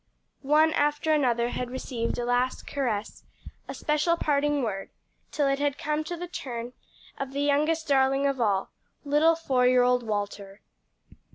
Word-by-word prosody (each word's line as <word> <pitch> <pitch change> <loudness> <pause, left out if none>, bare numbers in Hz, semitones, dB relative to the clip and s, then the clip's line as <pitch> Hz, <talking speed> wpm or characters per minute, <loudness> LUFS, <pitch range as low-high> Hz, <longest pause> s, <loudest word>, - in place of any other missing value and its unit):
One 305 +3 +3
after 295 +2 +1
another 240 -5 +2
had 245 0 -4
received 245 -2 -3
a 240 - -2
last 245 +1 0
caress, 230 -7 -3 0.4
a - - -6
special 305 +3 +1
parting 290 -2 +1
word, 195 -4 -3 0.4
till 290 -2 +1
it 275 0 +1
had 285 -1 0
come 300 +1 -1
to 345 +2 -5
the 350 - -5
turn 245 -7 -6 0.5
of 270 -1 -4
the 280 - -2
youngest 305 +3 +1
darling 270 0 +3
of 275 -2 0
all 200 -3 0 0.3
little 300 +3 +4
four 260 -6 +1
year 250 0 +5
old 250 0 +3
Walter. 205 -2 -4
275 Hz, 160 wpm, -27 LUFS, 245-295 Hz, 0.5 s, year